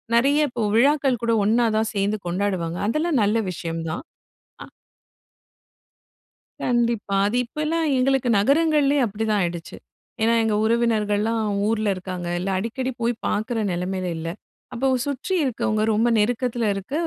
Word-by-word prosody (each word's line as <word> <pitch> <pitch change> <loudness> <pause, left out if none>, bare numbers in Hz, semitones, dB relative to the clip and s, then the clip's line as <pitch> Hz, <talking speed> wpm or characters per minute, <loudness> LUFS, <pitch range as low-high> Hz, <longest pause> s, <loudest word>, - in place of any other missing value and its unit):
நெறைய, 275 +5 +4
இப்போ 240 - -4
விழாக்கள் 270 0 +3
கூட 230 0 +2
ஒண்ணா 230 +3 +3
தான் 220 0 0
சேந்து 205 +1 0
கொண்டாடுவாங்க. 175 -2 -2
அதெல்லாம் 305 +3 +1
நல்ல 210 +3 +2
விஷயம் 165 -1 -5
தான். 160 - -5 0.6
அ. - - -11 2.0
கண்டிப்பா. 235 -4 0
அது 235 +4 -1
இப்பலாம் 305 +5 -1
எங்களுக்கு 265 -1 +2
நகரங்கள்லயே 290 +3 +3
அப்படிதான் 215 0 -1
ஆயிடுச்சு. 170 -2 -4 0.4
ஏன்னா, 225 +1 +3
எங்க 220 -1 +1
உறவினர்கள்லாம் 225 -1 +1 0.3
ஊர்ல 215 -1 0
இருக்காங்க. 185 -1 -6
இல்ல, 185 +2 -3
அடிக்கடி 245 +6 -3
போய் 235 +1 +1
பாக்குற 220 +2 -1
நெலமையில 180 +1 -2
இல்ல. 165 +1 -5 0.5
அப்போ 260 +3 0 0.2
சுற்றி 285 +6 -3
இருக்கவங்க, 215 -4 -1
ரொம்ப 225 +3 +2
நெருக்கத்தில 240 +1 0
இருக்க 195 +8 -7
225 Hz, 130 wpm, -23 LUFS, 205-255 Hz, 2.0 s, நெறைய